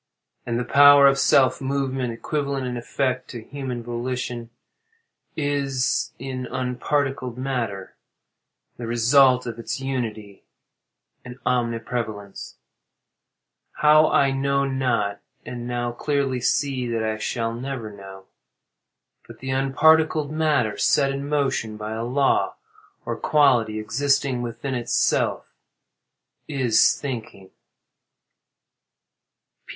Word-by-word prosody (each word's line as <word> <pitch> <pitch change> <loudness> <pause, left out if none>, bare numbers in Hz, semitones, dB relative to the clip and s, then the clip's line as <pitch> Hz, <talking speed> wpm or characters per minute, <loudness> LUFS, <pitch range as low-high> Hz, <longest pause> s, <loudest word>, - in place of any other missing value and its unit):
And 115 -1 -1
the - - -1
power 145 +2 +7
of 135 0 +5
self 130 -1 +3
movement 135 -2 -1
(equivalent 140 +2 -3
in 125 -1 -3
effect 130 +1 -2
to 120 -3 -8
human 130 -2 -6
volition) 120 0 -4 0.9
is, 140 -3 0
in 130 0 -5
the 125 - -6
unparticled 130 0 -2
matter, 120 -7 -4 0.8
the 120 - -6
result 125 +2 +4
of 120 -1 -6
its 115 - -4
unity 110 -7 -5 0.8
and 125 0 -10
omniprevalence; 115 -4 -3 1.2
how 155 +1 +5
I 135 -1 +3
know 140 +1 0
not, 125 -7 -1 0.3
and 120 -1 -6
now 120 0 -2
clearly 135 0 -1
see 130 -1 0
that 115 -1 -1
I 110 0 -2
shall 115 0 -2
never 120 -2 -5
know. 95 -1 -12 1.0
But - - -12
the 130 0 -5
unparticled 150 +3 +3
matter, 150 -10 0
set 135 +6 +3
in 140 +1 -5
motion 135 -7 -1
by 105 0 -6
a 110 +1 -3
law, 135 +3 +1 0.5
or - - -2
quality, 125 -8 +3
existing 135 +3 0
within 120 +3 -4
itself, 120 -2 0 1.0
is 130 -7 +3
thinking. 115 -8 -7
125 Hz, 110 wpm, -23 LUFS, 115-140 Hz, 1.2 s, power